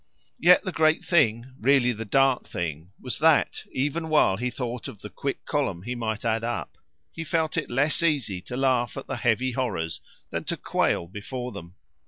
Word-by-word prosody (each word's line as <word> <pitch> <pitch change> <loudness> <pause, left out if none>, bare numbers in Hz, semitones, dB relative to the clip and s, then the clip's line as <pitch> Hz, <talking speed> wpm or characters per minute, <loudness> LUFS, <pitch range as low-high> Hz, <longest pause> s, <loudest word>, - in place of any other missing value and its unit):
Yet 180 +2 +6
the 185 - -3
great 155 -1 +2
thing, 130 -6 +2
really 130 0 +4
the 115 -1 -5
dark 135 +3 +3
thing, 80 -1 -4
was 125 - -4
that, 160 0 +3
even 150 +5 -1
while 150 -11 +4
he 125 +3 -1
thought 120 -1 -4
of 105 - -11
the 105 - -7
quick 140 - -4
column 130 - -1
he 125 +4 -3
might 115 -2 -3
add 115 0 +1
up, 120 0 -4 0.3
he 165 - -6
felt 160 -1 0
it 165 -4 -2
less 145 +7 +1
easy 140 - 0
to 125 +6 -6
laugh 130 -2 +1
at 135 - -5
the 135 - -4
heavy 120 +2 +1
horrors 95 - -2 0.3
than - - -2
to - - -2
quail - - 0
before 125 +7 -6
them. 85 -2 -10
125 Hz, 190 wpm, -26 LUFS, 110-145 Hz, 0.3 s, Yet